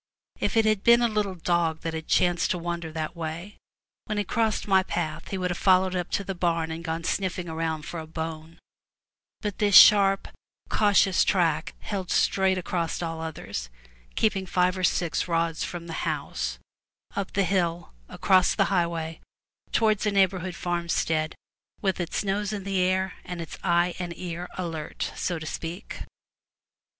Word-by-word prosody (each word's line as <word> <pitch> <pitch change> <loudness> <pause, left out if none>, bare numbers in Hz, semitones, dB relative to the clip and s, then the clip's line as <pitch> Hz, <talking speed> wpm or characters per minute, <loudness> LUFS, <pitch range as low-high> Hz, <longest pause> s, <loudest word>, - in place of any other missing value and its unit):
If - - 0
it 225 - +5
had 215 -2 +2
been 235 +1 +6
a - - +5
little 210 -4 -1
dog 170 -2 0
that 165 - -3
had 160 0 -5
chanced 175 -1 +2
to 185 - 0
wander 170 -1 -4
that 160 +2 -4
way, 170 +4 -6 0.5
when 215 -2 -3
he 205 - +1
crossed 220 +2 0
my 190 -1 +5
path 165 -4 -3
he 195 - -3
would 180 -1 -1
have 175 - -4
followed 185 -1 +4
it 185 - 0
up 175 - -4
to 200 - +1
the 195 - -4
barn 170 -2 0
and 160 - -4
have 170 - -10
gone 165 +1 -3
smelling 180 0 -1
around 160 -1 -2
for 170 - -6
a 160 - -7
bone; 160 0 -6 0.8
but 210 -3 -4
this 205 -2 +3
sharp, 195 -1 +8 0.4
cautious 200 -2 +4
track 165 -5 +1
held 190 -4 -4
straight 190 -1 +2
across 170 -2 -2
all 165 -1 -4
others, 100 - -5 0.5
keeping 195 -3 +1
five 180 0 +2
or 185 - -4
six 175 -1 +1
rods 165 -1 0
from 175 -1 -5
the 165 - -6
house, 60 -1 -2 0.6
up 200 -1 -3
the 200 - +2
hill, 175 - -1 0.2
across 185 -1 +3
the 195 - +3
highway 165 -2 -1 0.5
towards 215 -2 +2
a - - +2
neighborhood 190 -2 +1
farmstead, 170 -3 -1 0.4
with 190 -2 0
its 175 +3 -2
nose 200 +1 -1
in 205 -2 -4
the 195 -1 -1
air 185 +1 +1
and 180 -1 -6
its 165 -2 -6
eye 175 -1 +2
and 175 -2 -5
ear 175 0 -5
alert, 165 -4 -4
so 175 - -2
to 160 - -7
speak. 170 +5 -6
175 Hz, 175 wpm, -26 LUFS, 165-195 Hz, 0.8 s, sharp